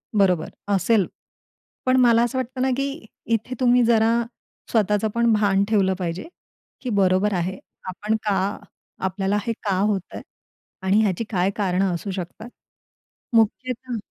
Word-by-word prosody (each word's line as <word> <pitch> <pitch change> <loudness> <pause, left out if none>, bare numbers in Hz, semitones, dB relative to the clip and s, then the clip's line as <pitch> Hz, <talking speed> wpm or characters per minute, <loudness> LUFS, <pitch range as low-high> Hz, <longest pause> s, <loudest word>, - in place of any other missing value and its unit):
बरोबर 185 -5 +3 0.2
असेल, 195 +1 +3 0.8
पण 255 0 +3
मला 235 -1 +5
असं 240 +2 -1
वाटतं 255 0 -3
ना, 265 - +2
की 275 -3 -3 0.2
इथे 230 +2 -1
तुम्ही 245 -1 +4
जरा 225 -1 +4 0.6
स्वतःचं 210 -1 +2
पण 235 0 +3
भान 200 -2 +3
ठेवलं 195 -3 +3
पाहिजे, 175 - -3 0.5
की 255 - -4
बरोबर 200 -1 +2
आहे. 185 +1 -2 0.3
आपण 210 +4 -1
का? 200 -1 0 0.5
आपल्याला 195 +2 0
हे 230 - +1
का 200 -4 0
होतंय? 200 -2 -1 0.6
आणि 195 +3 +3
ह्याची 205 0 0
काय 185 -2 +1
कारणं 190 -2 +1
असू 175 +4 -4
शकतात? 190 +5 -6 0.9
मुख्यतः 245 +2 +1
210 Hz, 135 wpm, -23 LUFS, 190-230 Hz, 0.9 s, मला